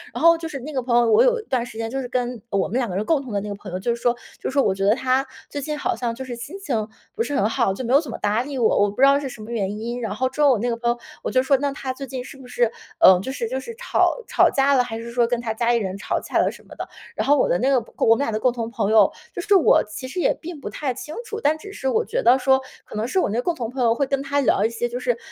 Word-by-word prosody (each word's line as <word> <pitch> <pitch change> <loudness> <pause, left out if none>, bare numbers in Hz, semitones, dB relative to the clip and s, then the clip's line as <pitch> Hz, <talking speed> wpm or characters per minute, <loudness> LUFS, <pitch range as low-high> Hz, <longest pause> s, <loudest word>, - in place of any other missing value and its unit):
然 - - -3
后 335 0 +8
就 330 0 -5
是 285 -4 -6
那 300 +4 -7
个 260 - 0
朋 240 -1 +1
友， 235 -1 +3
我 450 - +6
有 - - +3
一 - - -8
段 255 - 0
时 235 -2 -10
间 225 0 -3
就 270 +1 -2
是 250 - -5
跟 245 -2 -2
我 200 -3 0
们 230 - -2
2 245 - -1
个 180 - -4
人 205 +3 -1
共 310 0 +2
同 260 -4 -9
的 205 - 0
那 210 - -6
个 - - -3
朋 200 -2 -10
友， 180 - -2
就 235 +5 0
是 235 - -13
说 240 - +3 0.3
就 - - -3
是 - - -5
说 275 -1 +3
我 195 - +2
觉 195 0 -2
得 210 +2 +5
她 260 +1 +1 0.2
最 290 - -5
近 300 +2 -3
好 - - -1
像， 240 -2 -2
就 265 - -6
是 255 -2 -6
心 240 +11 -8
情 230 - -2 0.3
不 455 - -2
是 290 - -3
很 200 -5 +2
好， 230 -5 +1
就 225 - -5
没 245 +1 -1
有 280 - +7
怎 300 - -9
么 - - -5
搭 210 +3 +1
理 280 0 -6
我， 230 -3 +3
我 205 - +3
不 205 +6 -5
知 - - +9
道 275 +1 +5
是 285 - -4
什 230 - -10
么 215 +2 -8
原 205 -3 -2
因。 235 +2 -4
然 220 -3 -3
后 255 +3 0
之 265 +3 -4
后 290 -2 +6
我 240 - +2
那 240 +3 -1
个 235 - 0
朋 235 0 -1
友， 240 - +1 0.3
我 - - -1
就 255 - +3
说：” 275 +1 +3
那 280 +1 -1
她 265 -1 -4
最 275 +1 -7
近 260 -1 -5
是 265 - -11
不 265 -2 -13
是， 240 -2 +1 0.3
呃， 185 -1 +8
就 230 +8 -4
是 235 -4 -3
就 260 +2 -2
是 460 - -8
吵 - - +1
吵 - - +4
架 275 +1 +3
了？ 255 -2 +4
还 230 -2 -5
是 235 +1 -7
说 240 -1 +2
跟 240 0 -1
她 225 -2 -2
家 235 +1 +1
里 240 - +3
人 195 -4 -3
吵 200 - -2
架 - - -2
了 - - +3
什 - - -15
么 - - -13
的？ - - -6 0.3
“然 - - -2
后 290 +1 +5
我 - - +2
的 - - +3
那 260 - +2
个 275 - +4 0.2
我 225 - +5
们 - - -5
俩 - - -2
的 215 - -1
共 250 +1 +2
同 230 -2 -4
朋 220 -3 -1
友， 215 -3 +6 0.2
就 - - -4
是 405 +3 +3
我 370 - +5
其 260 +5 -6
实 315 +8 -5
也 - - +3
并 335 -2 -8
不 - - -5
太 275 -4 -3
清 300 +5 -8
楚， 440 -1 -5
但 310 -4 +2
只 400 +6 -10
是 265 - -4
我 450 - +1
觉 - - -1
得 255 - +6
说， 265 +1 +3 0.2
可 - - -11
能 215 +2 -1
是 375 - +1
我 - - +1
那 225 +4 0
共 345 - 0
同 235 -6 -4
朋 255 +1 -2
友 230 -1 +4
会 280 - +1
跟 275 0 0
她 280 +1 0
聊 245 -7 +2
一 - - +2
些 230 +1 -2
就 240 +1 -5
是， 245 -2 0
250 Hz, 375 characters per minute, -22 LUFS, 225-275 Hz, 0.3 s, 知